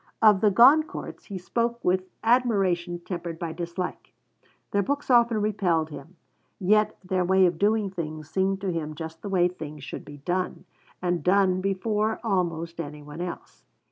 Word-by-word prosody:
Of 210 -3 +6
the 210 - +5
Goncourts 265 +10 +4
he 200 - -6
spoke 235 +6 -1
with 185 +1 +1
admiration 195 -8 +2
tempered 170 -2 -5
by 165 -1 -4
dislike. 175 +2 -5 0.6
Their 200 - +2
books 285 +6 -2
often 235 -2 +5
repelled 180 -7 0
him, 155 +5 -10 0.4
yet 210 +3 +3
their 185 0 0
way 190 +1 +4
of 170 -2 0
doing 210 -1 +2
things 155 -4 -5
seemed 190 +3 0
to 195 -2 -1
him 155 -2 -4
just 160 +1 -7
the 200 - -5
way 180 -2 +3
things 155 -5 -8
should - - -7
be 145 0 -11
done; 180 +5 -3 0.4
and 175 -3 0
done 185 0 +3
before 210 +3 0
almost 170 -5 -1
any 150 -1 -8
one 150 +3 -8
else. 180 -1 -7
185 Hz, 165 wpm, -26 LUFS, 170-205 Hz, 0.6 s, Of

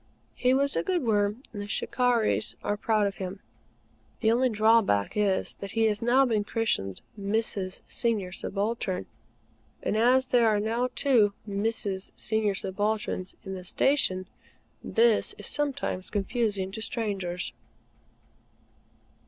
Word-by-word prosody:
He 250 - +2
was 280 +1 +2
a - - +2
good 360 -5 0
Worm; 210 +1 +1
and 205 - -5
the 205 - -6
"Shikarris" 240 +1 +1
are 205 - 0
proud 215 0 +1
of 200 -1 -2
him. 190 +1 -5 0.8
The 220 - +4
only 250 +2 +3
drawback 215 - +3
is 205 -3 0
that 200 - -7
he 225 - +2
has 210 -1 +1
been 240 -2 +3
christened 205 - -1 0.2
"Mrs. 200 -2 -2
Senior 215 -6 -1
Subaltern;" 195 -1 -2 0.8
and - - 0
as 255 +3 +4
there 240 -2 +4
are 210 -1 +3
now 230 +4 0
two 230 -8 +4
Mrs. 200 -1 -2
Senior 215 -2 0
Subalterns 205 0 -2
in 190 - -6
the 185 -1 -6
Station, 185 -2 +2 0.6
this 230 -1 +2
is - - -9
sometimes 275 -10 -2
confusing 205 -2 -1
to 220 +3 -6
strangers. 195 -6 -2
215 Hz, 130 wpm, -28 LUFS, 195-235 Hz, 0.8 s, The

